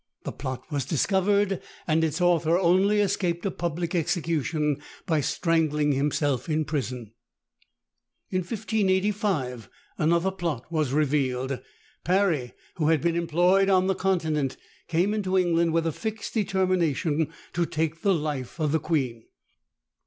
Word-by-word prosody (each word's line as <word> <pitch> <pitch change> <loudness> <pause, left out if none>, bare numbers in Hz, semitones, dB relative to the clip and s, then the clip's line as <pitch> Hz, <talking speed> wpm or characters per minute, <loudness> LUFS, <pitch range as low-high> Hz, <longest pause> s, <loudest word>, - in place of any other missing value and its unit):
The - - -4
plot 130 -2 -5
was 140 -2 0
discovered, 195 - +1 0.2
and 160 0 +2
its 160 +1 0
author 170 -2 +3
only 190 +4 +3
escaped 180 -3 0
a 195 - 0
public 170 0 -3
execution 160 -4 0 0.2
by 160 -5 +1
strangling 155 -2 +1
himself 140 0 0
in 155 0 +1
prison. 125 -7 -3 1.2
In 185 - +1
1585 190 - -1 0.3
another 170 +4 +2
plot 170 -10 -3
was 155 -5 0
revealed. 135 -3 0 0.4
Parry, 175 -8 +1 0.2
who 155 -3 +1
had 160 -1 +4
been 170 0 +1
employed 175 +4 +3
on 185 -1 +4
the 190 - +2
Continent, 160 -8 0 0.3
came 175 +5 +1
into 190 -3 0
England 170 -2 +2
with 165 0 +1
a 165 - +1
fixed 220 +5 -5
determination 175 - +1 0.2
to 170 -1 0
take 160 +1 -2
the 195 -2 +3
life 150 -3 -4
of 155 -2 +1
the 160 - +2
queen. 130 -8 -1
165 Hz, 135 wpm, -26 LUFS, 150-185 Hz, 1.2 s, had